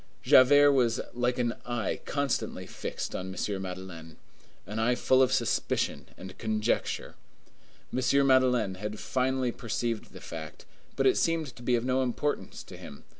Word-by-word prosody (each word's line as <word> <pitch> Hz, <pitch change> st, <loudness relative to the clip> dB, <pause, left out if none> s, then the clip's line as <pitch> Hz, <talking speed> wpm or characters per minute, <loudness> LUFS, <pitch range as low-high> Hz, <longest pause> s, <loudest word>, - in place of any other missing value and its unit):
Javert 145 Hz, +3 st, +7 dB
was 125 Hz, -3 st, +2 dB
like 125 Hz, 0 st, 0 dB
an 120 Hz, -1 st, 0 dB
eye 120 Hz, -4 st, -2 dB
constantly 140 Hz, -3 st, -2 dB
fixed -, -, -5 dB
on 95 Hz, 0 st, -4 dB
M. 95 Hz, +1 st, -2 dB
Madeleine. 90 Hz, -4 st, -8 dB, 0.5 s
An 105 Hz, +2 st, -5 dB
eye 120 Hz, +2 st, +2 dB
full 130 Hz, +1 st, +3 dB
of 130 Hz, -, +4 dB
suspicion -, -, 0 dB
and 95 Hz, 0 st, -9 dB
conjecture. 110 Hz, 0 st, -1 dB, 0.8 s
M. 135 Hz, +2 st, +3 dB
Madeleine 125 Hz, -6 st, +3 dB
had 105 Hz, 0 st, -4 dB
finally 130 Hz, -1 st, 0 dB
perceived 115 Hz, -2 st, -3 dB
the -, -, -11 dB
fact; 80 Hz, -2 st, -8 dB, 0.3 s
but -, -, 0 dB
it -, -, +4 dB
seemed 165 Hz, -5 st, 0 dB
to -, -, -13 dB
be 120 Hz, 0 st, +2 dB
of 120 Hz, 0 st, -1 dB
no 130 Hz, +1 st, +2 dB
importance 130 Hz, +4 st, -2 dB
to -, -, -11 dB
him. 70 Hz, -, -11 dB
120 Hz, 155 wpm, -29 LUFS, 105-130 Hz, 0.8 s, Javert